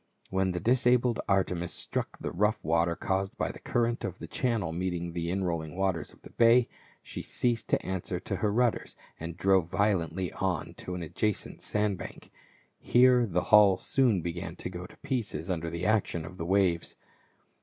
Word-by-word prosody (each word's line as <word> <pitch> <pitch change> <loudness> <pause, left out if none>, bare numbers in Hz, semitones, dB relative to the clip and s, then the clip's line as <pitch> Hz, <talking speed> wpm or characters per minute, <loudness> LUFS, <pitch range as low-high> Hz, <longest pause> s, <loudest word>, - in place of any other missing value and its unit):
When 95 0 +1
the 90 - -2
disabled 125 +1 +3
Artemis 90 -3 +1
struck - - -4
the - - -4
rough 105 +2 0
water 85 +1 +2
caused 95 +1 -2
by - - -1
the - - -12
current 120 0 0
of 95 -1 -4
the - - -7
channel 115 -10 -1
meeting 85 0 -3
the 85 -1 -2
inrolling 85 -4 -2
waters 95 -5 -1
of - - -22
the - - -12
bay, 115 +1 +5 0.4
she - - -6
ceased 120 -2 -1
to - - 0
answer 95 -1 -3
to 95 - -4
her 105 +2 +1
rudders* 120 +1 0 0.2
and 85 +1 -6
drove 95 -3 +3
violently 95 -3 0
on 90 -5 -2
to 90 - -6
an 90 - -4
adjacent 105 +5 -2
sandbank; 105 -3 -3 0.5
here 125 -1 +5
the 90 -2 0
hull 100 -3 +8
soon 115 -9 +2
began 85 0 -4
to 90 - -6
go 90 0 -7
to - - -18
pieces 110 - -3
under 85 -2 -2
the 85 +2 -4
action 100 -6 +1
of 90 +1 -10
the 85 - -3
waves. 95 -3 +1
95 Hz, 175 wpm, -29 LUFS, 85-110 Hz, 0.5 s, hull